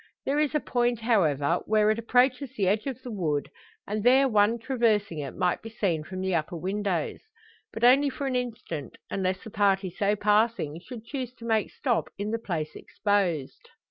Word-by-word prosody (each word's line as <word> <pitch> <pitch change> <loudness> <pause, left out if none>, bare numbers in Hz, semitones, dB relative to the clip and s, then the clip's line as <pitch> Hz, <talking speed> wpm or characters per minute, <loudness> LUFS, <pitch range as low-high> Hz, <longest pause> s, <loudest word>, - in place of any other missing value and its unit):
There 285 +2 +1
is 305 0 +1
a - - +4
point, 240 -3 0
however, 170 - +2
where 215 0 +4
it 215 - -1
approaches 250 +3 +2
the 195 -3 +1
edge 210 +6 +1
of 260 -2 -4
the 245 - -6
wood, 155 -8 -1 0.3
and 210 0 -3
there 265 +3 +6
one 215 -1 +3
traversing 225 - 0
it 140 -2 -5
might 180 -1 0
be 225 - -8
seen 185 -8 -1
from 185 +4 -6
the 190 0 -1
upper 165 +1 -1
windows. 190 -1 -2 0.5
But 225 - -6
only 270 +4 +6
for 275 +1 -5
an 265 -2 -1
instant, 225 - -4
unless 185 -1 -1
the 220 - -9
party 195 -2 +2
so 200 +3 +1
passing 210 -6 +1
should 230 +4 -10
choose 255 -1 -4
to 230 - -11
make 220 -2 +1
stop 245 -5 -1
in 205 +2 -3
the 230 - -1
place 160 -8 -4
exposed. 185 -9 -1
210 Hz, 190 wpm, -27 LUFS, 185-240 Hz, 0.5 s, there